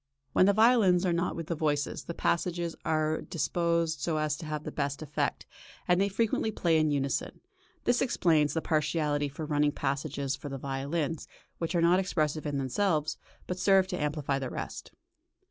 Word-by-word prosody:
When 185 - +5
the 200 - +5
violins 215 -5 +5
are 175 - +2
not 175 +2 0
with 165 - -4
the 170 - -2
voices, 150 -2 -1
the 170 - -5
passages 170 -1 -1
are 155 0 0
disposed 170 -1 0
so 155 +3 -1
as 155 -1 0
to 160 - -8
have 150 -1 -3
the - - -5
best 140 +1 -2
effect, 150 -1 -2 0.4
and 180 +1 +4
they 200 - +2
frequently 220 +2 0
play 170 -6 +2
in 155 0 +2
unison; 140 -2 -1 0.4
this 245 0 +2
explains 165 - +2
the 160 - -1
partiality 150 -2 0
for 155 +3 -6
running 150 -1 +1
passages 140 -1 -2
for 145 - -8
the 135 - -4
violins, 140 +4 -3 0.3
which 165 +1 -2
are 170 - +3
not 175 +2 +5
expressive 155 -5 -1
in 145 -1 -2
themselves, 155 +3 0 0.3
but 180 0 -4
serve 195 0 +5
to 180 -4 -3
amplify 145 -2 -1
the 130 -2 -4
rest. - - -6
155 Hz, 180 wpm, -29 LUFS, 145-175 Hz, 0.4 s, When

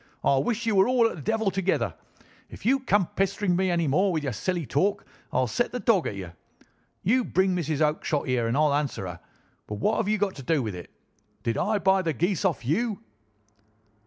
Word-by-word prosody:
"I 140 - +3
wish 230 - -1
you 225 - +1
were 190 +1 +5
all 250 -2 +4
at - - -5
the 160 - -9
devil 220 +2 0
together. 190 0 0 0.6
If - - -12
you 270 +4 +4
come 205 -7 +2
pestering 195 -1 +1
me 190 +1 +1
any 170 -2 +1
more 185 +8 +2
with 160 -3 -1
your 135 -4 -2
silly 175 - -2
talk 200 +10 0 0.3
I'll 130 0 +2
set 180 - -1
the 250 - -3
dog 215 -8 +2
at - - -4
you. 95 -3 -7 0.7
You 250 +6 +3
bring 190 -3 +1
Mrs. 160 -3 -1
Oakshott 150 -1 0
here 125 -3 0
and 115 - 0
I'll 150 -1 +3
answer 145 -9 -1
her, 90 -2 -7 0.5
but 105 - -4
what 210 - 0
have 225 - 0
you 215 +1 +2
to 195 -8 -2
do 140 +1 +1
with 110 -3 -3
it? 90 -1 -9 0.5
Did 115 - 0
I 215 0 +1
buy 190 -1 +3
the 165 -3 -1
geese 175 - 0
off 165 -9 0
you?" 205 - -1
180 Hz, 215 wpm, -26 LUFS, 140-205 Hz, 0.7 s, were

